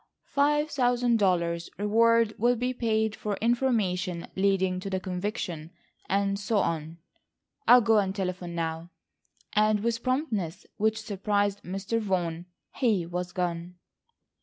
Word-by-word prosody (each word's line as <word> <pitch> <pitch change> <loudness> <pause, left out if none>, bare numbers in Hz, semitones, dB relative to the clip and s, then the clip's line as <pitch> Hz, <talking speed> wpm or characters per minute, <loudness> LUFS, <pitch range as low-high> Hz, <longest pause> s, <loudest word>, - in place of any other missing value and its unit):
Five 295 +2 +2
thousand 245 -3 +2
dollars 170 -3 +1
reward 230 +2 +3
will 240 +3 +3
be 250 +2 -1
paid 220 -3 0
for 210 -1 -3
information 210 -8 0
leading 190 -1 +1
to 195 - -5
the 190 -1 -1
conviction—and 190 +1 -3
so 205 +2 0
on. 165 -3 -1 0.7
I'll 245 0 +8
go 225 -1 +4
and 195 -1 -1
telephone 180 -3 -3
now," 165 0 -3 0.6
and 215 0 +3
with 230 +1 0
a - - -30
promptness 235 - -2
which 220 +1 +1
surprised 205 -1 0
Mr. 195 +5 -2
Vaughan, 175 -5 -2 0.3
he 215 -9 +1
was 175 +1 -4
gone. 175 -1 -3
200 Hz, 130 wpm, -27 LUFS, 180-230 Hz, 0.7 s, I'll